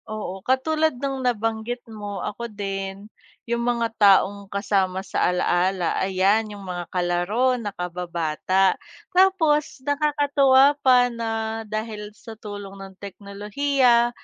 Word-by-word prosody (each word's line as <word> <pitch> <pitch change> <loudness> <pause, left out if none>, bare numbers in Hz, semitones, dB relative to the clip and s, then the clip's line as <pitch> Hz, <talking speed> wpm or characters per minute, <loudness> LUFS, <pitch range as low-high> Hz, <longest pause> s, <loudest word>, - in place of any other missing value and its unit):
Oo, 200 -3 -5
katulad 310 +5 +1
nung 270 0 -3
nabanggit 225 0 -2
mo 205 -4 -6
ako 235 +3 -5
din, 195 -1 -5 0.4
yung 235 0 -1
mga 235 -1 0
taong 200 0 +4
kasama 195 -2 -1
sa - - 0
alaala, 180 0 +1
ayan, 195 +3 +2
yung 200 - -11
mga 175 -2 -5
kalaro 180 +8 +1
na 210 - -3
kababata. 180 0 0 0.4
Tapos 360 -5 +3
nakakatuwa 285 -2 +4
pa 250 -2 +4
na 225 -1 -3
dahil 215 -1 -5
sa 225 - -10
tulong 205 -2 -9
ng 195 -1 -10
teknolohiya, 235 +6 +1
215 Hz, 120 wpm, -23 LUFS, 195-245 Hz, 0.4 s, taong